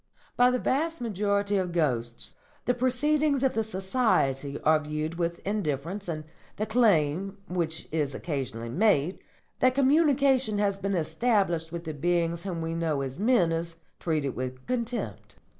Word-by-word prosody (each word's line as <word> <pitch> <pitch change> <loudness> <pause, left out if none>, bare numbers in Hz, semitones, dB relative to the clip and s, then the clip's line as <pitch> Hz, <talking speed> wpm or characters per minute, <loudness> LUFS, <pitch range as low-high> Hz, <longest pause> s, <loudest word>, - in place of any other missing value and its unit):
By 245 0 +5
the 250 - +1
vast 320 +7 0
majority 205 -2 0
of 185 -2 -1
ghosts 120 -8 -1 0.3
the 245 - +3
proceedings 275 +3 +1
of 265 - +3
the 225 - +1
Society 190 - 0
are 155 0 +4
viewed 155 +2 -4
with 170 0 0
indifference, 190 -1 -2
and 155 -3 -3 0.3
the 215 - -1
claim, 195 -5 +2
which 165 -3 -2
is 150 -4 -1
occasionally 130 -7 -4
made, 180 - +2 0.4
that 255 0 +4
communication 275 -5 +3
has 200 -1 +1
been 195 0 -1
established 170 -1 +1
with 170 0 -5
the 160 -2 -4
beings 170 +3 0
whom 175 -4 -3
we 165 0 -2
know 160 -4 0
as 135 +2 -5
men 210 -6 +3
is 165 0 -3 0.2
treated 150 -5 -1
with 130 0 -5
contempt. 245 -1 -3
180 Hz, 150 wpm, -28 LUFS, 155-230 Hz, 0.4 s, By